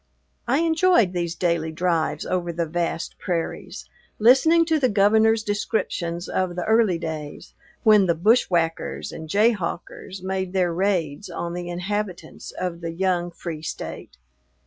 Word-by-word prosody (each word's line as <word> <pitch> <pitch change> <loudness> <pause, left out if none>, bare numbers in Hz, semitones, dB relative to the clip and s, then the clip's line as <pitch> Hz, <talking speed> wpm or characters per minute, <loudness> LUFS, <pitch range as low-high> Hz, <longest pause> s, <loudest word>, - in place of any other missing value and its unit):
I 270 +6 +2
enjoyed 325 - +3
these 170 -1 -2
daily 170 -3 0
drives 165 -1 -1
over 175 -2 -1
the 170 0 -2
vast 170 +1 -3
prairies, 170 -3 -4 0.3
listening 270 +9 +5
to 320 -1 +1
the 255 -3 +2
Governor's 220 +2 +4
descriptions 185 -4 -2
of 185 -2 -1
the 180 - -2
early 220 -5 +3
days 155 -3 -6 0.3
when 210 -4 +6
the 170 - +2
"bushwhackers 170 -4 +1
and 160 -1 -8
jayhawkers" 195 -2 -1
made 190 -1 -3
their 180 -3 +1
raids 180 -1 -1
on 170 0 -4
the 175 0 -5
inhabitants 185 +2 -4
of 175 -2 -5
the 165 0 -4
young 175 -1 0
free 170 -2 -7
State. 155 - -7
180 Hz, 140 wpm, -23 LUFS, 170-210 Hz, 0.3 s, when